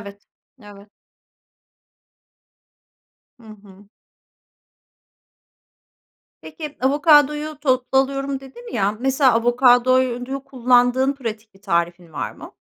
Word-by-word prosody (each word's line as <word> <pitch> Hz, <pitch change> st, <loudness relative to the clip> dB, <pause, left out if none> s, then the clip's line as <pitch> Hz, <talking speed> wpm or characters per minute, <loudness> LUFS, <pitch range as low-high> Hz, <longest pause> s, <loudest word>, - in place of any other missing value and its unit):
Evet. 200 Hz, 0 st, -13 dB, 0.4 s
Evet. 205 Hz, 0 st, -15 dB, 2.5 s
Hı -, -, -18 dB, 0.2 s
hı. 195 Hz, 0 st, -18 dB, 2.5 s
Peki, 300 Hz, -3 st, -9 dB
avokadoyu 295 Hz, +2 st, +2 dB
toplu 260 Hz, -1 st, +1 dB
alıyorum 275 Hz, 0 st, -2 dB
dedin 360 Hz, -, -13 dB
ya, 200 Hz, 0 st, 0 dB
mesela, 265 Hz, 0 st, +2 dB
avokadoyu 250 Hz, +2 st, +2 dB
kullandığın 250 Hz, +1 st, +2 dB
pratik 225 Hz, -5 st, -8 dB
bir 195 Hz, -, -23 dB
tarifin 170 Hz, 0 st, -2 dB
var -, -, -5 dB
mı? -, -, -14 dB
255 Hz, 85 wpm, -20 LUFS, 215-275 Hz, 2.5 s, avokadoyu